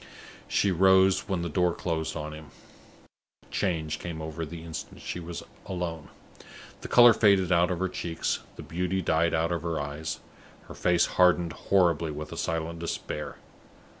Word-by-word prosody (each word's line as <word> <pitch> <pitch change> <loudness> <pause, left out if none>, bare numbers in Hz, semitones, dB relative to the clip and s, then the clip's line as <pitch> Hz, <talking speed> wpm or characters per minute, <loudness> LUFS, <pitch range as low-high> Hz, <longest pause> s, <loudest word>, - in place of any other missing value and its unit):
She 100 - +2
rose 95 +2 +4
when 90 -3 -1
the - - -1
door 90 +1 +1
closed 80 -3 -2
on 75 0 -5
him. 80 0 -10 1.0
A - - -23
change 80 -5 -1
came 85 -2 -6
over 80 +1 -5
her - - -1
the 85 0 -8
instant 80 -1 -7
she - - -5
was 85 0 -6 0.2
alone. 85 -4 -4 0.7
The - - -6
color 120 -1 +8
faded 100 -5 +4
out 85 0 +4
of 90 - -1
her 95 +2 0
cheeks; 85 -2 -2 0.2
the - - -9
beauty 90 +2 -2
died 80 +1 +2
out 80 +1 +1
of 85 - -1
her 85 -1 -2
eyes; 80 +3 -4 0.4
her - - -11
face 90 -1 +2
hardened 90 -2 +3
horribly 85 -4 +2
with 75 0 -6
a - - -7
silent 80 0 -2
despair. 80 -2 -4
85 Hz, 170 wpm, -28 LUFS, 80-90 Hz, 1.0 s, color